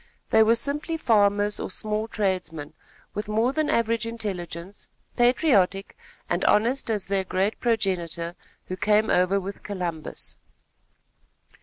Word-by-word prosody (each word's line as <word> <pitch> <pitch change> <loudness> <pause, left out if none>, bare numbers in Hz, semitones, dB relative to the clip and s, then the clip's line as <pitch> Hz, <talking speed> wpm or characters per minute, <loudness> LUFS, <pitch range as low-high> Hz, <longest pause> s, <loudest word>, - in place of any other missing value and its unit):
They 220 - +6
were 220 +1 +5
simply 290 +7 -1
farmers 205 -5 +2
or - - -4
small 215 +3 -1
tradesmen, 180 -8 -2 0.4
with 210 0 -4
more 225 +5 +2
than 310 0 0
average 230 0 +1
intelligence, 190 -5 -5 0.3
patriotic 235 - +2 0.3
and - - -1
honest 235 +5 +2
as 210 -3 -1
their 195 -1 0
great 190 +3 -1
progenitor, 180 -7 -1 0.3
who 185 - -5
came 215 +2 +3
over 185 +2 +3
with 195 +1 -7
Columbus. 175 -6 -5
205 Hz, 125 wpm, -25 LUFS, 185-230 Hz, 0.4 s, They